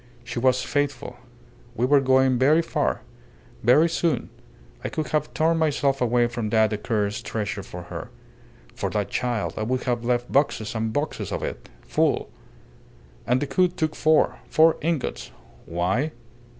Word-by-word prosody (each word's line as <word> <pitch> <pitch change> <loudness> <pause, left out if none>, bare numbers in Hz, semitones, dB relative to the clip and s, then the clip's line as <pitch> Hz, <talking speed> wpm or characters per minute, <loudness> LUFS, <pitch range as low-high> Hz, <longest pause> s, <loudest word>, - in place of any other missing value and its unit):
"She 120 0 -4
was 130 +1 +2
faithful. 145 -3 -2 0.6
We 120 +2 +1
were 140 +1 +5
going 130 -1 +3
very 150 +6 +4
far - - -1 0.6
very 140 +8 +5
soon. 165 -1 -1 0.5
I - - -2
could 155 - -3
have 150 -1 0
torn 165 +1 +2
myself 140 -3 +1
away 120 0 +3
from 120 -2 -3
that 110 0 +3
accursed 105 -1 -1
treasure 105 -2 -3
for 90 -2 -9
her. 90 - -7 0.6
For - - -3
that - - -2
child 120 -4 -1
I - - -2
would 125 +3 -1
have 120 -2 -1
left 120 0 0
boxes 135 -6 +1
and 110 -1 -2
boxes 145 +6 -3
of - - -3
it - - -6
full. - - 0 1.0
And 125 +2 +2
Decoud 180 +5 +1
took 155 -1 -1
four. 155 0 +3
Four 160 +1 +5
ingots. 160 -3 -2 0.4
Why? 95 - 0
125 Hz, 150 wpm, -24 LUFS, 115-150 Hz, 1.0 s, were